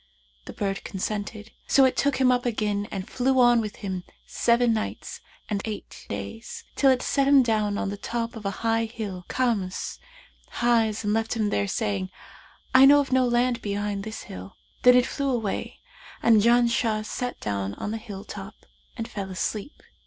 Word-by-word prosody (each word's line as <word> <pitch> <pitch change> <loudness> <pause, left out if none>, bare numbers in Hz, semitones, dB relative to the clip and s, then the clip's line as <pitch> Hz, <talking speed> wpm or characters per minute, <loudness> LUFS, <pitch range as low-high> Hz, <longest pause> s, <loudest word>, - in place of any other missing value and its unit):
The - - -8
bird 195 -1 -2
consented; 210 +2 -4 0.2
so 270 - +6
it 260 - +2
took 285 -1 +1
him 260 -1 +4
up 245 0 +1
again 210 -3 -1
and 195 0 -5
flew 260 +1 +1
on 240 -1 +6
with 210 -2 -5
him 190 -3 -5 0.2
seven 235 0 +2
nights 215 -1 -4 0.3
and 205 -2 -2
eight 215 -2 -7
days, 100 - -6
till 275 - +4
it 255 -1 +3
set 275 -1 +1
him 280 -1 +7
down 215 -3 0
on 195 - -1
the 200 - -5
top 230 +2 -3
of 225 - -8
a 200 - 0 0.2
high 225 0 +2
hill 205 -6 -6
Karmus 220 -8 -1 0.5
highs 225 -3 +1
and 205 0 +1
left 225 +1 0
him 215 -2 0
there 100 0 0
saying, 95 -2 -1 0.6
'I 260 +1 +9
know 290 +1 +8
of 280 -2 -1
no 255 -1 +4
land 240 0 +1
behind 205 -1 -2
this 220 +1 -6
hill.' 95 +1 -10 0.2
Then 250 0 +7
it 250 0 +5
flew 280 0 -2
away 225 -6 -3 0.4
and 225 -2 +6
Janshah 235 -1 +3
sat 245 +3 -4
down 100 -1 -3
on 205 - -4
the 225 - -2
hill 205 -3 -8
top 200 0 -8 0.4
and 225 -1 -4
fell 195 -2 -5
asleep. 200 +6 -4
220 Hz, 180 wpm, -25 LUFS, 200-245 Hz, 0.6 s, I